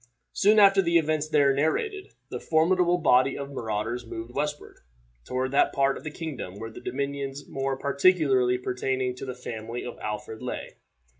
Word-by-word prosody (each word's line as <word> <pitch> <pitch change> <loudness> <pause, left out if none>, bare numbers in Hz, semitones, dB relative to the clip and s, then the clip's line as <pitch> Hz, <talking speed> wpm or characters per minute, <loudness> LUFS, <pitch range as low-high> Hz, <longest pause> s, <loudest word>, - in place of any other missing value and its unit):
Soon 210 +2 +4
after 195 -1 +7
the 170 -2 +3
events 155 -1 0
there 145 -3 +4
narrated, 380 - -1 0.2
this - - -7
formidable 175 +2 +3
body 130 -4 +3
of 140 0 -6
marauders 115 -1 -3
moved 115 +1 -8
westward, 150 +1 -4 0.5
toward 130 +1 -2
that 140 - +3
part 135 0 +2
of - - -9
the 155 - -4
kingdom 150 - -6
where 115 +1 -7
the - - -11
dominions 140 +1 -4
more 135 0 -2
particularly 140 -4 +3
pertaining 125 0 -2
to 125 - -8
the 130 - -5
family 115 -1 -6
of 125 - -7
Alfred 105 +1 -5
lay. 125 - -5
135 Hz, 165 wpm, -26 LUFS, 125-155 Hz, 0.5 s, after